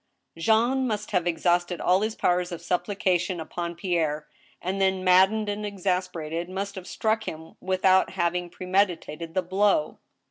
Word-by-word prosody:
Jean 230 +9 +2
must 210 -2 -3
have 180 -3 +1
exhausted 175 +1 +1
all 185 +2 +3
his 220 +1 -1
powers 180 0 +1
of 170 - -5
supplication 180 0 0
upon 170 +2 -5
Pierre, 160 -5 -1 0.3
and 190 +2 -3
then, 190 -1 +2
maddened 190 +4 +4
and 205 +1 -3
exasperated, 180 -4 -2
must 195 +2 -4
have 190 -2 -8
struck 220 0 -1
him 160 +1 -8
without 190 0 +3
having 175 +1 -1
premeditated 175 -3 -1
the 185 - +1
blow. 190 -3 +1
185 Hz, 145 wpm, -26 LUFS, 175-200 Hz, 0.3 s, maddened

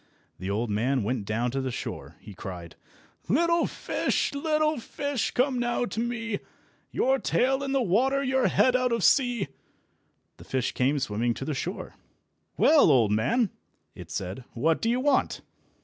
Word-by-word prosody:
The 95 +2 -4
old 105 +3 -1
man 120 +4 +1
went 110 -1 -2
down 115 +4 -1
to 135 +2 -2
the 130 - -2
shore. 120 - -6
He 105 - -11
cried— 90 -3 -8 0.5
"Little 335 - +3
fish, - - -1
little 305 0 +1
fish, 285 +1 -2
come 255 0 +1
now 240 0 0
to 220 0 -5
me, 230 -3 -2 0.5
Your 265 +1 +1
tail 265 +2 +1
in 275 -1 -3
the 270 -2 +2
water, 265 +8 +2
your 265 -1 +2
head 255 -1 +3
out 255 -1 +2
of 230 -4 0
sea!" 245 - +3 0.9
The - - -12
fish 130 -2 -1
came 135 +3 +1
swimming 120 -2 -1
to 135 - -5
the 155 - -2
shore. 180 +8 -5 0.6
"Well, 305 - +6
old 120 -7 +4
man!" 210 - +1 0.4
it - - -11
said, 95 +7 -5
"what 160 +7 +1
do 225 - +1
you 245 +2 +1
want?" 280 0 +1
225 Hz, 165 wpm, -27 LUFS, -, 0.9 s, Well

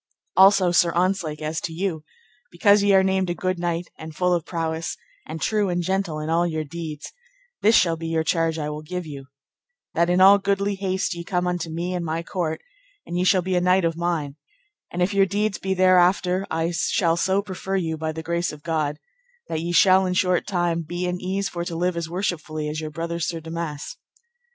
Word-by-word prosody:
Also, 190 -1 +6
Sir 175 -1 +4
Ontzlake, 175 -4 0
as 155 +1 -2
to 165 - -4
you, 165 -2 -3 0.5
because 205 -3 +4
ye 200 0 +3
are 190 -1 +6
named 190 -1 +1
a 175 - -1
good 185 -1 -2
knight, 170 0 -2
and 160 -1 -9
full 180 +1 +2
of 170 -1 -1
prowess, 165 -1 -3 0.3
and 160 +1 -6
true 210 +2 +1
and 175 0 -1
gentle 190 -3 -1
in 155 - -4
all 170 +2 +2
your 160 -2 -2
deeds, 155 -1 -7 0.5
this 220 +2 +5
shall 170 -2 +4
be 165 0 -6
your 165 -1 0
charge 165 -1 0
I 150 -1 -3
will 150 0 -6
give 180 +3 -5
you, 140 -3 -9 0.7
that 170 +1 +2
in 180 +1 +3
all 195 +2 +8
goodly 200 0 0
haste 190 -1 -1
ye 170 0 -6
come 180 0 -1
unto 175 -2 -2
me 170 +3 -3
and 180 -1 -2
my 165 +1 -2
court, 165 -3 -3 0.4
and 175 - -6
ye 180 - +1
shall 185 -1 +3
be 185 +1 -1
a 180 - +2
knight 180 0 +3
of 165 -1 0
mine, 165 -4 -2 0.5
and 180 +1 -1
if 190 +3 0
your 195 -1 +4
deeds 205 +1 -1
be 190 0 -1
thereafter 185 0 +3
I 165 +1 -1
shall 170 0 +1
so 190 +3 +1
prefer 195 0 -4
you, 165 -4 -1
by 160 0 -3
the 160 +1 -7
grace 170 +1 -1
of 150 -1 -12
God, 155 -3 -1 0.5
that 160 - -2
ye 170 +1 -3
shall 190 +2 +5
in 180 - -1
short 180 -1 +1
time 175 -3 0
be 175 +3 -4
in 180 0 -3
ease 195 +2 -1
for 170 -1 -4
to 170 -1 -5
live 180 +1 0
as 170 -1 -3
worshipfully 160 -4 -3
as 155 +1 -4
your 155 - -4
brother 170 +2 -4
Sir 165 0 -2
Damas. 165 - -6
175 Hz, 220 wpm, -23 LUFS, 160-185 Hz, 0.7 s, all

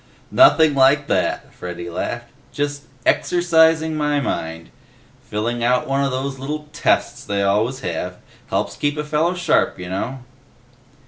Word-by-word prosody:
"Nothing 160 - +6
like 140 +2 +4
that," - - -1
Freddy 85 -1 -7
laughed. 120 +7 -4 0.2
"Just, 145 0 -3 0.2
exercising 160 -2 +3
my 150 -1 +1
mind. 80 -10 -4 0.6
Filling 115 +3 -2
out 125 +1 +2
one 135 +1 +1
of 140 - +1
those 135 +1 -3
little 150 +3 -5
tests - - 0
they 100 0 -1
always 110 +7 +1
have. 90 0 -4 0.3
Helps - - -2
keep 145 +1 -1
a 150 - -1
fella 155 +4 0
sharp, 175 -3 +2
you 90 -1 -7
know." 120 +8 -4
135 Hz, 140 wpm, -20 LUFS, 105-150 Hz, 0.6 s, Nothing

